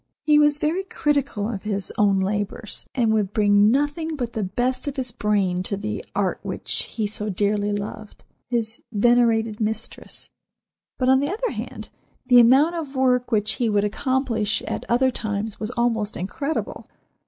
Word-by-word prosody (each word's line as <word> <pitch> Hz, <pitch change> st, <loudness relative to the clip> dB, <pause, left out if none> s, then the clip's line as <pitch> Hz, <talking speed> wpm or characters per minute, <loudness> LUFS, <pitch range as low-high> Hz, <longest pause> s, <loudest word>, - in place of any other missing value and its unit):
He 300 Hz, 0 st, +5 dB
was 295 Hz, -1 st, +4 dB
very 315 Hz, +5 st, 0 dB
critical 280 Hz, -, -1 dB
of 215 Hz, -4 st, -4 dB
his 200 Hz, -3 st, -3 dB
own 200 Hz, -2 st, +3 dB
labors, 205 Hz, +2 st, -2 dB
and 230 Hz, -4 st, +2 dB
would 210 Hz, -2 st, 0 dB
bring 205 Hz, -1 st, +4 dB
nothing 290 Hz, +5 st, 0 dB
but 245 Hz, -4 st, -4 dB
the 220 Hz, -, -2 dB
best 245 Hz, +8 st, -1 dB
of 285 Hz, -, -3 dB
his 255 Hz, -2 st, -2 dB
brain 200 Hz, -5 st, 0 dB
to 195 Hz, +2 st, -3 dB
the 210 Hz, +2 st, -4 dB
art -, -, 0 dB
which -, -, -1 dB
he 220 Hz, -, -3 dB
so 210 Hz, 0 st, -3 dB
dearly 205 Hz, +1 st, 0 dB
loved—his 220 Hz, +2 st, -5 dB
venerated 225 Hz, -1 st, +2 dB
mistress. 220 Hz, 0 st, -4 dB, 0.7 s
But, 255 Hz, -, 0 dB
on 265 Hz, 0 st, +5 dB
the 285 Hz, +4 st, -1 dB
other 465 Hz, +5 st, -2 dB
hand, -, -, -7 dB, 0.4 s
the 250 Hz, -1 st, +7 dB
amount 265 Hz, +8 st, +6 dB
of 305 Hz, -5 st, -5 dB
work 250 Hz, -1 st, +2 dB
which 215 Hz, -1 st, +1 dB
he 240 Hz, -1 st, 0 dB
would 205 Hz, -1 st, +2 dB
accomplish 230 Hz, -1 st, 0 dB
at -, -, -4 dB
other 260 Hz, +2 st, +3 dB
times 210 Hz, -2 st, -4 dB
was 215 Hz, -, -3 dB
almost 225 Hz, -3 st, 0 dB
incredible. 280 Hz, -, -4 dB
225 Hz, 165 wpm, -23 LUFS, 210-260 Hz, 0.7 s, the